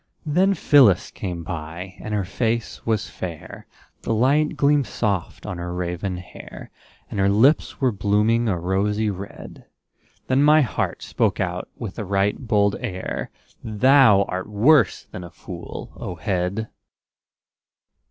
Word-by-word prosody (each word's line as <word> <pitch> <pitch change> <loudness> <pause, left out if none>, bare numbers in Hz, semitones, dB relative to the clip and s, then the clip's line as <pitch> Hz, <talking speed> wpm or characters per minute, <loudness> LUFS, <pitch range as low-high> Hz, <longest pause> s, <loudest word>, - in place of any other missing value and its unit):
Then 185 +6 +2
Phyllis 130 - +4
came 90 -4 -5
by, 85 +2 -6
and 110 - -7
her 105 -2 0
face 115 +3 -2
was 110 -2 0
fair, 85 -4 -8 0.3
The 115 - -1
light 140 +6 +2
gleamed 145 -2 +3
soft 100 -6 -2
on 90 - -5
her 85 0 -4
raven 90 +1 -3
hair; 90 - -11 0.4
And - - -3
her 95 0 +3
lips 120 +10 +3
were 130 -2 +2
blooming 105 +3 +1
a 95 - 0
rosy 105 +4 0
red. 100 +1 -10 0.6
Then 130 +1 +2
my 150 +2 +6
heart 125 - -2
spoke - - 0
out 90 -1 -3
with 115 -2 -6
a - - -2
right 100 +1 +1
bold 105 -4 +1
air: 95 -6 -4 0.3
"Thou 110 -1 +5
art 95 +1 -5
worse 115 - +3
than 90 - -9
a 85 - -9
fool, 85 - -9
O 90 - -6
head!" 100 +3 -2
105 Hz, 145 wpm, -23 LUFS, 90-120 Hz, 0.6 s, my